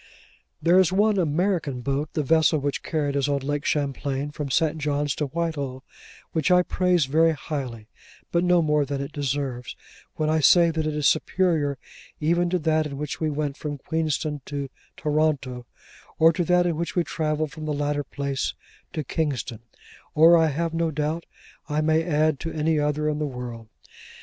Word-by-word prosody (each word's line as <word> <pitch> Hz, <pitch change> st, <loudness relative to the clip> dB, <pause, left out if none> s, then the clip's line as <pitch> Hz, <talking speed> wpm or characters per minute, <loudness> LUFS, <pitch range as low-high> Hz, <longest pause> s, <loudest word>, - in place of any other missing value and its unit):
There 175 Hz, +2 st, +5 dB
is 185 Hz, -2 st, +4 dB
one 205 Hz, +1 st, +3 dB
American 160 Hz, -5 st, 0 dB
boat—the 145 Hz, +4 st, -2 dB
vessel 160 Hz, +1 st, +4 dB
which 145 Hz, -1 st, -2 dB
carried 145 Hz, -3 st, -1 dB
us 140 Hz, 0 st, +1 dB
on 140 Hz, -1 st, 0 dB
Lake 145 Hz, +1 st, -2 dB
Champlain, 140 Hz, -1 st, -1 dB
from 145 Hz, -1 st, -5 dB
St. 160 Hz, +3 st, +1 dB
John's 145 Hz, -1 st, 0 dB
to 150 Hz, -, -2 dB
Whitehall—which 145 Hz, -1 st, -4 dB
I 180 Hz, 0 st, +5 dB
praise 180 Hz, -4 st, +2 dB
very 160 Hz, +4 st, +3 dB
highly, 130 Hz, -7 st, -5 dB, 0.4 s
but 170 Hz, 0 st, +2 dB
no 180 Hz, -1 st, +4 dB
more 150 Hz, -1 st, +2 dB
than 140 Hz, 0 st, -3 dB
it 140 Hz, +1 st, -5 dB
deserves, 135 Hz, -3 st, -3 dB, 0.4 s
when 155 Hz, -, -1 dB
I 155 Hz, +1 st, +2 dB
say 170 Hz, +3 st, +6 dB
that 160 Hz, -1 st, -1 dB
it 155 Hz, -, -2 dB
is 150 Hz, -2 st, +2 dB
superior 155 Hz, -4 st, +1 dB, 0.4 s
even 170 Hz, +3 st, +2 dB
to 180 Hz, -, +1 dB
that 155 Hz, -1 st, +1 dB
in 140 Hz, -2 st, -7 dB
which 150 Hz, -1 st, -4 dB
we 155 Hz, -, +1 dB
went 145 Hz, -1 st, -2 dB
from 145 Hz, -1 st, -4 dB
Queenston 155 Hz, -1 st, -2 dB
to 140 Hz, -2 st, -5 dB, 0.3 s
Toronto, 145 Hz, -5 st, 0 dB, 0.5 s
or 165 Hz, +1 st, +6 dB
to 175 Hz, -, 0 dB
that 180 Hz, 0 st, +3 dB
in 170 Hz, -3 st, 0 dB
which 170 Hz, -1 st, -3 dB
we 175 Hz, -, +3 dB
travelled 155 Hz, -2 st, -2 dB
from 155 Hz, -1 st, -7 dB
the 155 Hz, -, -2 dB
latter 145 Hz, 0 st, -1 dB
place 140 Hz, -1 st, -3 dB, 0.4 s
to 155 Hz, -, -2 dB
Kingston, 135 Hz, -6 st, -2 dB, 0.6 s
or 165 Hz, +3 st, +7 dB
I 165 Hz, -1 st, +4 dB
have 165 Hz, +3 st, -2 dB
no 165 Hz, 0 st, 0 dB
doubt 155 Hz, +2 st, -2 dB, 0.4 s
I 150 Hz, +1 st, +1 dB
may 160 Hz, +1 st, +2 dB
add 155 Hz, -3 st, +1 dB
to 165 Hz, -, -4 dB
any 155 Hz, 0 st, +1 dB
other 150 Hz, +1 st, 0 dB
in 150 Hz, 0 st, -1 dB
the 150 Hz, -, -1 dB
world. 120 Hz, -4 st, -7 dB
150 Hz, 180 wpm, -25 LUFS, 140-160 Hz, 0.6 s, or